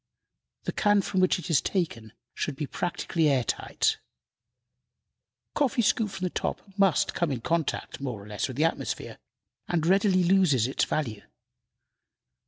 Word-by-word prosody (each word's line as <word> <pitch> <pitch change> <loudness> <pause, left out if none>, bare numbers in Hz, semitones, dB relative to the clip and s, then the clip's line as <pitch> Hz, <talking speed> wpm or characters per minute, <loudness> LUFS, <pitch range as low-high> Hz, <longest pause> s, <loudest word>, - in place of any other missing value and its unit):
The - - -2
can 205 -1 +3
from 190 - -1
which 185 0 +3
it 180 - -7
is 140 - +4
taken 115 - -2 0.2
should 145 - -3
be 150 - -3
practically 165 0 -1
air 135 -3 +2
tight. - - 0 1.5
Coffee 275 -4 +1
scooped 210 -1 +1
from 190 - -6
the 180 - 0
top - - -2 0.2
must 195 -5 +3
come 170 -4 0
in 125 -4 -3
contact, 165 -3 -2
more 120 -7 -4
or - - -13
less, 105 -1 -2
with 130 - -7
the 155 - +3
atmosphere, 165 - -3 0.5
and 165 -2 0
readily 190 0 +4
loses 175 - +4
its 130 - +1
value. 115 -9 -2
165 Hz, 155 wpm, -27 LUFS, 135-190 Hz, 1.5 s, is